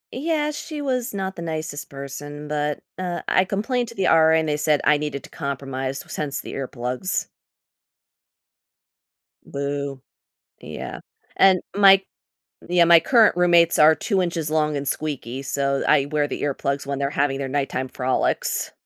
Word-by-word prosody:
Yeah, 300 +2 0
she 300 0 -6
was 255 -3 -1
not 190 -1 -3
the 170 - -7
nicest 155 -3 -5
person, 145 +2 -8
but, 150 0 -2 0.2
uh, 175 -2 -3
I 185 - +3
complained 230 +5 -1
to 230 - -12
the 190 -3 0
RA, 160 0 +5
and 160 -1 0
they 150 - 0
said 150 -1 +2
I 150 0 +4
needed 150 -2 -4
to - - -12
compromise 135 -1 -4
s - - -9
hence 145 -2 -3
the - - -8
earplugs. 130 +5 -3 2.2
Boo. 140 -1 -4 0.6
Yeah. - - -7 0.4
And 190 -2 +5 0.2
my 195 -1 +7 0.7
yeah, 175 -1 +5
my 170 0 +8
current 225 0 +4
roommates 170 -1 +4
are 155 +1 +8
2 195 +1 0
inches 170 -4 -2
long 155 -1 +1
and 140 -1 -4
squeaky, 135 -4 -3
so 140 0 -1
I 145 -2 +4
wear 150 0 0
the - - -5
earplugs 140 0 -2
when 140 -1 -3
they're 140 0 0
having 140 -1 0
their 135 -1 -4
nighttime 135 -2 -2
frolics. 130 0 -1
150 Hz, 160 wpm, -23 LUFS, 140-180 Hz, 2.2 s, my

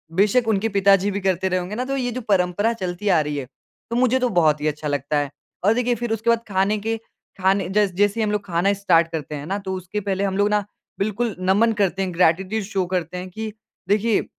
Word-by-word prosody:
बेशक 215 +5 +3
उनके 220 +1 +1
पिताजी 200 0 +3
भी 200 - -2
करते 190 0 +1
रहे 185 0 +1
होंगे 180 +4 -5
ना 250 +3 -2
तो 275 +1 -2
ये 245 -2 -1
जो 255 +2 -4
परंपरा 195 +3 +2
चलती 190 -1 -3
आ 170 -4 +5
रही 150 -1 -3
है, 135 - -4 0.4
तो 235 - -2
मुझे 255 +1 +3
तो 250 -1 +1
बहुत 150 -2 +3
ही 155 - 0
अच्छा 150 0 -3
लगता 145 +1 -1
है। 145 0 -1 0.3
और 215 - +5
देखिए 245 0 +1
फिर 235 0 -4
उसके 225 +1 -1
बाद 230 0 +2
खाने 195 +2 +1
के 225 0 0 0.4
खाने 190 -1 +2
जैस 200 -2 +2
जैसे 205 +3 +2
ही - - +2
हम 210 - 0
लोग 210 -1 -2
खाना 180 +3 +1
स्टार्ट 175 -4 +3
करते 150 -2 -4
है 145 0 -6
ना, 195 +4 -2
तो 190 -1 -5
उसके 185 +3 -4
पहले 195 0 -1
हम 195 -1 -1
लोग 205 +1 +3
ना 210 -1 +1 0.3
बिल्कुल 215 +1 -1
नमन 205 +5 +3
करते 195 0 +1
हैं, 185 -2 -2
ग्रैटिट्यूड 185 +5 +2
शो 190 -2 -1
करते 175 0 -2
हैं 185 +1 -6
कि 220 +3 -5 0.4
देखिए 215 +1 +3
अ, - - -10
195 Hz, 245 wpm, -22 LUFS, 180-220 Hz, 0.4 s, आ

